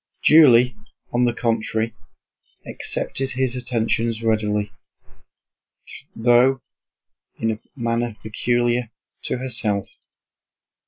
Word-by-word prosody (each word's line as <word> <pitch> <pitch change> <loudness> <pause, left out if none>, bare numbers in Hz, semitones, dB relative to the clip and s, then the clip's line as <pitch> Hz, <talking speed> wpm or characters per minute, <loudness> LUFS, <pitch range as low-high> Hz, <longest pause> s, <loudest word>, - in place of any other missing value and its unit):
Julie 125 -6 +6 0.4
on 120 +1 +3
the 120 - +2
contrary 115 -1 -1 0.7
accepted 135 0 -3
his 130 -1 -1
attentions 115 -2 -1
readily, 105 -2 0 1.4
though 125 +3 +3 0.7
in 115 - 0
a 110 - -5 0.2
manner 115 -2 -2
peculiar 120 +2 0 0.4
to - - -1
herself. 110 -6 -1
120 Hz, 85 wpm, -22 LUFS, 110-125 Hz, 1.4 s, Julie